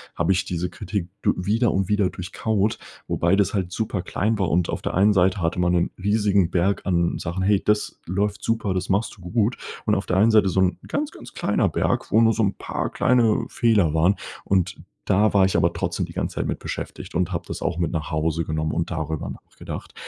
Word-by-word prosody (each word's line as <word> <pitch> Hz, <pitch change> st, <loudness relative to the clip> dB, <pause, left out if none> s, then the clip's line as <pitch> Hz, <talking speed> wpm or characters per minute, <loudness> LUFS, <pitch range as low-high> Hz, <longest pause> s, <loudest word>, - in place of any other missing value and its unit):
habe 85 Hz, +2 st, +1 dB
ich 95 Hz, -, +1 dB
diese 90 Hz, 0 st, -2 dB
Kritik 100 Hz, -5 st, -4 dB
du -, -, +2 dB
wieder 110 Hz, +6 st, +1 dB
und 95 Hz, -1 st, 0 dB
wieder 105 Hz, -2 st, +2 dB
durchkaut, 100 Hz, +3 st, -1 dB, 0.3 s
wobei 85 Hz, +3 st, +2 dB
das 100 Hz, 0 st, +1 dB
halt 95 Hz, -4 st, -1 dB
superklein 105 Hz, +1 st, -1 dB
war. 95 Hz, -4 st, +1 dB
Und 85 Hz, +2 st, +1 dB
auf -, -, -3 dB
der -, -, -3 dB
einen 100 Hz, +3 st, +5 dB
Seite 95 Hz, 0 st, +2 dB
hatte 85 Hz, +2 st, 0 dB
man 90 Hz, 0 st, +2 dB
'nen 85 Hz, -1 st, +1 dB
riesigen 100 Hz, -3 st, +2 dB
Berg 95 Hz, +3 st, +1 dB
an 85 Hz, -2 st, +1 dB
Sachen: 90 Hz, +2 st, -3 dB
„Hey, 100 Hz, 0 st, +3 dB
das 105 Hz, 0 st, 0 dB
läuft 100 Hz, +3 st, -1 dB
super, 115 Hz, -4 st, 0 dB
das 90 Hz, +1 st, -3 dB
machst 100 Hz, +3 st, 0 dB
du -, -, -17 dB
gut.“ 105 Hz, +6 st, 0 dB, 0.3 s
Und 105 Hz, -, +2 dB
auf 100 Hz, -, -2 dB
der 90 Hz, -, +1 dB
einen 110 Hz, +4 st, +5 dB
Seite 105 Hz, -3 st, +5 dB
so 95 Hz, -, 0 dB
'n 95 Hz, -1 st, +1 dB
ganz, 295 Hz, +1 st, -2 dB
ganz -, -, -12 dB
kleiner -, -, +1 dB
Berg, -, -, -1 dB
wo 110 Hz, -, +5 dB
nur 115 Hz, 0 st, +5 dB
so 115 Hz, -, -1 dB
'n 100 Hz, -1 st, +1 dB
paar -, -, -3 dB
kleine 120 Hz, -4 st, +2 dB
Fehler 105 Hz, -9 st, +2 dB
waren. 85 Hz, +5 st, +3 dB, 0.3 s
Und 95 Hz, -1 st, 0 dB, 0.2 s
da 105 Hz, +3 st, +3 dB
war 100 Hz, -2 st, +5 dB
ich 95 Hz, -, +1 dB
aber -, -, +2 dB
trotzdem -, -, -2 dB
die -, -, -12 dB
ganze -, -, -3 dB
Zeit -, -, -1 dB
mit -, -, -3 dB
beschäftigt -, -, -6 dB
und 90 Hz, +1 st, 0 dB
habe 85 Hz, -, -2 dB
das -, -, -6 dB
auch 85 Hz, -, -1 dB
mit 85 Hz, -3 st, 0 dB
nach 80 Hz, -2 st, -3 dB
Hause 80 Hz, +1 st, 0 dB
genommen 80 Hz, 0 st, -1 dB
und 85 Hz, +3 st, -2 dB
darüber 80 Hz, -2 st, -3 dB
nachgedacht -, -, -9 dB
95 Hz, 225 wpm, -23 LUFS, 85-105 Hz, 0.3 s, einen